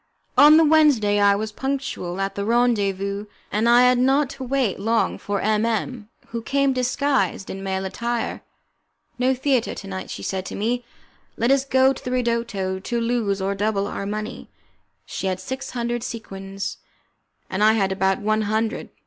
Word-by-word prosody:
On 295 +4 +8
the 325 - +6
Wednesday 285 -10 +4
I 200 0 +5
was 215 +1 -3
punctual 265 -8 -3
at 195 0 -1
the 200 - -3
rendezvous, 205 -3 +1 0.2
and 220 +3 +2
I 240 +1 +7
had 250 0 +4
not 270 +2 +3
to 265 - -7
wait 260 -7 0
long 225 +3 0
for 205 -1 -2
M 215 0 +1
M, 230 0 -2 0.2
who 230 0 -4
came 275 +3 +1
disguised 255 -3 0
in 195 - -6
male 190 0 -2
attire. 235 +4 -3 0.8
"No 260 +1 +2
theatre 260 -2 0
to 195 - -8
night," 190 -1 -6
she - - -6
said 190 -1 -2
to - - -6
me; 240 +4 -1 0.5
"let 235 +3 +2
us 275 -1 +3
go 265 0 +4
to - - -11
the - - -4
'ridotto', 235 -6 -1
to 235 +5 -2
lose 230 -5 0
or 195 +1 0
double 200 0 0
our 200 0 -4
money." 215 +3 -5 0.6
She 195 - -4
had 185 -1 -1
six 260 +8 -5
hundred 240 -1 -2
sequins. 195 -4 -6 0.7
I 210 +3 +4
had 195 -3 +1
about 190 0 +1
one 215 +1 +1
hundred. 220 +2 -1
225 Hz, 175 wpm, -23 LUFS, 200-250 Hz, 0.8 s, On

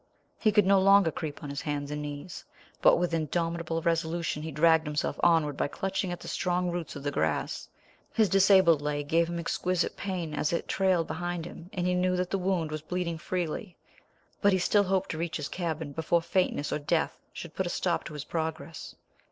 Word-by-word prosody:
He 215 - +3
could 210 -1 +4
no 195 0 +5
longer 195 -3 +5
creep 155 -2 -6
on 145 - -5
his 140 - -4
hands 145 -1 -3
and 150 0 -3
knees, 145 +4 -6 0.4
but - - +7
with 175 0 0
indomitable 165 +1 -1
resolution 165 -2 0
he 160 - -5
dragged 160 +1 +4
himself 150 0 -2
onward 160 -4 +3
by - - 0
clutching 190 +3 -2
at 175 - -5
the - - -9
strong 180 0 0
roots 170 -3 -4
of 140 - -7
the 145 - -1
grass. 80 - -1 0.4
His 220 -2 +3
disabled 190 -4 +5
leg 145 0 -2
gave 165 +2 +2
him 170 - -3
exquisite 180 +1 -1
pain 180 -5 -4
as 150 +2 0
it 170 - -1
trailed 185 -3 +2
behind 175 0 -3
him, 170 0 -10
and 180 -5 -2
he 180 - +2
knew 180 0 +2
that 180 0 -1
the 195 - 0
wound 180 -4 0
was 155 0 -4
bleeding 170 0 -3
freely; 175 +2 -3 0.6
but 200 -1 +5
he - - +4
still 205 +3 +3
hoped 190 0 0
to 160 - -5
reach 165 -1 -2
his 150 -3 -4
cabin 160 -4 -3
before 165 +3 +1
faintness 180 -5 0
or - - -1
death 160 +3 -1
should 170 - -8
put 190 - -1
a - - -2
stop 175 -1 0
to - - -7
his 150 -1 -5
progress. 160 -1 -4
170 Hz, 210 wpm, -29 LUFS, 155-180 Hz, 0.6 s, but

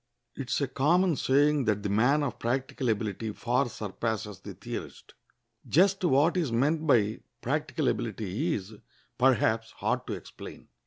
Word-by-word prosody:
] - - -53
It 130 - -7
is - - +1
a 140 - +1
common 165 +7 +2
saying 145 +1 +2
that 105 -2 0
the 100 - -1
man 125 +9 +3
of 140 - -3
practical 125 +1 -1
ability 110 0 -2
far 125 +3 0
surpasses 105 -1 -4
the - - -9
theorist. - - -8 0.5
Just 190 +5 +3
what 155 +1 +3
is 160 -8 0
meant 150 +7 +1
by 110 -6 +3 0.2
practical 145 +1 -1
ability 115 - -1
is, 100 +2 -7 0.5
perhaps, 115 -3 +3
hard - - -2
to - - -3
explain. - - -10
125 Hz, 155 wpm, -28 LUFS, 110-150 Hz, 0.5 s, man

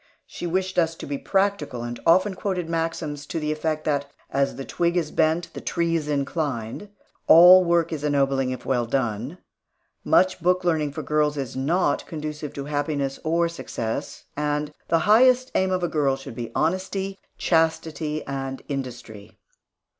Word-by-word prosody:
She 175 - -6
wished 185 +1 0
us 165 -1 +1
to - - -8
be 140 -1 -4
practical, 195 - 0
and 120 0 -5
often 185 +4 +4
quoted 185 -2 -3
maxims 165 -3 -3
to 165 - -3
the 150 0 -1
effect 155 0 -2
that, 145 -2 0 0.2
"As 140 0 0
the 135 - -6
twig 170 0 0
is 160 -3 -1
bent, 160 +2 +1
the - - -7
tree's 165 -3 -1
inclined"; 140 - -2 0.4
"All 180 +3 +9
work 170 -1 +1
is 150 -2 -4
ennobling 135 -2 +1
if 130 -1 -5
well 120 -3 0
done"; 120 - -2 0.7
"Much 185 -1 +3
book 180 +2 +2
learning 155 -4 +1
for - - -5
girls 150 -1 +1
is 135 -4 -4
not 155 +8 0
conducive 150 -2 -5
to 140 - -5
happiness 145 -2 -2
or 170 +2 +2
success"; 115 -9 -5
and 150 0 -1
"The 165 - +3
highest 255 +4 +5
aim 190 0 +2
of 185 -1 -1
a - - +2
girl 145 -4 +1
should 135 -1 -9
be 115 -1 -6
honesty, 190 +3 -1 0.2
chastity, 160 -2 0
and 135 -1 -5
industry." 120 -6 -7
155 Hz, 160 wpm, -24 LUFS, 140-170 Hz, 0.7 s, All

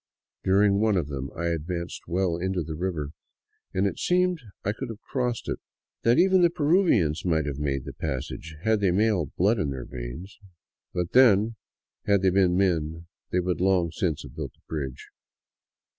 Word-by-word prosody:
During 100 +1 +4
one 110 -2 +3
of 80 -5 -1
them 70 -1 -4
I 85 +1 0
advanced 85 +1 -4
well 90 -1 +1
into 90 0 -1
the 80 - -5
river, 80 -3 -3 0.6
and 95 +2 +1
it 100 - -1
seemed 180 -1 +2 0.3
I 105 - +2
could 120 +4 -6
have 110 -2 -7
crossed 125 -3 -2
it; - - -2 0.4
that 115 +3 +4
even 185 +1 +5
the 175 - +6
Peruvians 150 - +2
might 80 -4 +1
have 70 -1 -4
made 70 -3 -1
the - - -7
passage, 80 +2 -5
had 110 -1 +3
they 100 -2 +2
male 95 -3 +2
blood 105 +5 +3
in 75 - 0
their 65 -3 -5
veins. 65 - -8 0.5
But 90 -1 -2
then, 115 -3 +5 0.5
had 100 -2 +3
they 95 - +4
been 90 -1 +3
men 80 -3 0 0.3
they 90 - +2
would 90 0 -1
long 90 -3 +2
since 85 -3 -1
have - - -12
built - - -6
a - - -36
bridge. 70 -4 -5
90 Hz, 180 wpm, -26 LUFS, 80-105 Hz, 0.6 s, the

